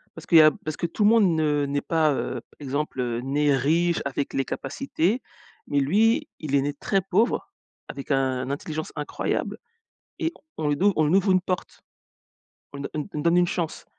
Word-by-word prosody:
parce - - -10
qu'il 170 - +5
y - - +10
a 155 0 +7
parce 155 -1 -4
que - - -2
tout 190 +5 -1
le 210 - +6
monde 205 -7 +4
ne 150 -2 +1
n'est 140 0 -1
pas, 155 -3 +2
heu, - - -3 0.2
exemple, 130 -4 -2
né 145 +1 +2
riche 165 +6 +1
avec 140 0 -3
les 135 - 0
capacités 200 - -2 0.5
mais 145 - +1
lui, 225 - +2
il 145 -3 -2
est 140 - +4
né 145 +1 -2
très 195 +6 0
pauvre 200 +6 0 0.4
avec 140 +1 -8
un 130 -1 0
intelligence 155 +2 -4
incroyable 150 -1 -2 0.6
et 325 - 0 0.2
on 150 -2 -1
lui 145 - +1
ouv 200 +1 +4
on 155 -1 +3
lui 180 - +4
ouvre 195 0 +3
une 185 - +4
porte, 185 0 -4 0.9
on 140 - -6
on 150 - -3
on 150 - -3
donne 170 +3 +3
une 175 - +4
chance. 165 -3 -3
155 Hz, 195 wpm, -25 LUFS, 140-180 Hz, 0.9 s, y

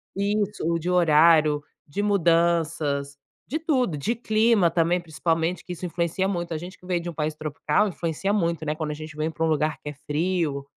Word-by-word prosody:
Isso 205 -1 -1
o 170 0 +1
de 175 +3 -3
horário, 155 -3 +5 0.2
de 150 +8 -3
mudanças, 165 -6 +1 0.3
de 310 +6 -3
tudo, 255 - 0
de 225 +12 -1
clima 220 -5 +3
também, 170 +1 +2
principalmente 165 +1 -1
que 180 - -5
isso 180 +2 -6
influencia 170 +2 -1
muito. 175 -3 -2
A - - -2
gente 180 +4 -9
que 180 - -17
veio 180 -2 -1
de 175 - -5
um - - -6
país 155 0 -2
tropical, 155 +6 0
influencia 170 +3 -2
muito, 170 -6 0
né, 150 +1 -1
quando 155 -1 -3
a - - -2
gente 155 0 -9
vem 155 +1 0
pra 160 +1 -3
um - - +1
lugar 155 0 +1
que 150 - -4
é - - -6
frio, 155 -3 -1
170 Hz, 205 wpm, -25 LUFS, 155-185 Hz, 0.3 s, horário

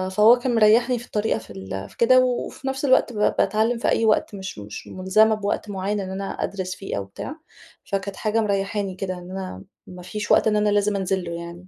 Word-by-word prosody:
فهو 220 +3 +7
كان 245 -1 -1
مريّحني 230 +3 +4
في 240 - -10
الطريقة 210 - -1
في 110 - -15
ال 95 0 -6
في - - -20
كده، 255 +2 +6
وفي 255 +2 -3
نفس 270 +1 -2
الوقت 260 -2 +3
ب - - -10 0.2
باتعلّم 225 +3 +2
في - - -2
أي 225 - +2
وقت 215 -1 +2
مش 190 - -7
مش 105 +1 -9
مُلزمة 215 +4 +3
بوقت 205 0 -3
معيّن 200 +1 -2
إن 190 -1 -4
أنا 195 +1 -4 0.2
أدرس 185 -2 -4
فيه 195 - -5
أو 100 - -2
بتاع. 270 - -7 0.5
فكانت 195 0 -3
حاجة 220 +1 0
مريّحاني 200 -1 -1
كده، 185 0 -3
إن 180 0 -9
أنا 185 - -6 0.2
ما 180 0 -10
فيش 210 +2 -4
وقت - - +5
إن 210 - +2
أنا 210 0 +2
لازم 205 0 +2
أنزل 190 -1 -1
له 170 - -6
يعني. 170 +2 -8
205 Hz, 220 wpm, -23 LUFS, 185-220 Hz, 0.5 s, فهو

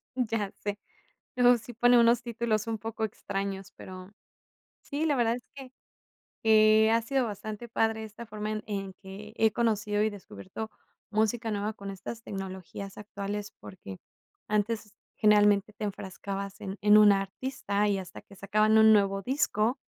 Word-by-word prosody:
Mm, 255 -1 +1
ya 210 -3 -1
sé. 205 0 -4 0.6
No, 245 0 +6
sí 235 +2 -10
pone 245 +1 +5
unos 235 0 +4
títulos 230 -2 -1
un 225 -1 -2
poco 225 +1 -4
extraños, 195 -2 -4
pero 185 +1 -10 0.7
sí, 300 +2 -2
la 295 -3 +2
verdad 235 -2 +2
es 245 - -9
que, 265 -2 -10 0.7
eh, 215 0 +6
ha 230 +1 +4
sido 260 +3 0
bastante 215 +1 -6
padre 225 -1 0
esta 220 +2 -10
forma 210 -1 -5
en 215 0 -3
en 195 -2 -4
que 200 +2 -10
he 220 0 +4
conocido 215 -2 +1
y 215 - +2
descubierto 205 +1 -8 0.4
música 220 +2 0
nueva 210 +1 -2
con 200 -2 -8
estas 195 +4 -7
tecnologías 195 -1 -7
actuales, 205 0 -5
porque, 100 - -10 0.5
antes 215 0 -1 0.2
generalmente 210 -1 +4
te 210 - -6
enfrascabas 195 0 -5
en 195 0 -5
en 210 0 +7
un 210 -1 +8
artista 200 +1 -1
y 200 -1 +1
hasta 185 -2 -8
que 200 - -17
sacaban 215 +3 +2
un 220 0 +8
nuevo 195 -2 +3
disco, 245 -1 0
215 Hz, 160 wpm, -29 LUFS, 200-225 Hz, 0.7 s, un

